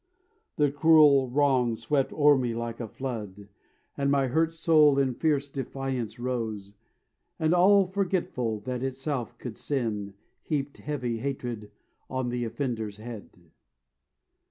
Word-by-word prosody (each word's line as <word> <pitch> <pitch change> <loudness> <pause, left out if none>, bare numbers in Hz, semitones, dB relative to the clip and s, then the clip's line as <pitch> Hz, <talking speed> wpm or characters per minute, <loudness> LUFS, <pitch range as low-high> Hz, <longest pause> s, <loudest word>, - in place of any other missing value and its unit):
The 145 -2 +2
cruel 145 -3 +5
wrong 130 -3 +2
swept 135 +3 0
o'er 145 -1 +5
me 125 -3 -1
like 115 0 -4
a 115 - -4
flood; 105 -6 -6 0.5
And 140 0 0
my 140 -2 +2
hurt 160 +5 +2
soul 155 -3 +4
in 135 -2 +2
fierce 145 0 0
defiance 135 -3 -4
rose, 115 -5 -4 0.6
And 160 +1 +2
all 195 +2 +5
forgetful 175 - -2
that 125 +3 -4
itself 130 -2 -3
could 120 -3 -7
sin 105 -8 -2 0.3
Heaped 140 -2 -3
heavy 125 -6 -3
hatred 120 -5 -4 0.4
on 130 -1 -2
the 120 0 -2
offender's 110 -4 -3
head. 105 -7 -11
130 Hz, 130 wpm, -27 LUFS, 115-145 Hz, 0.6 s, cruel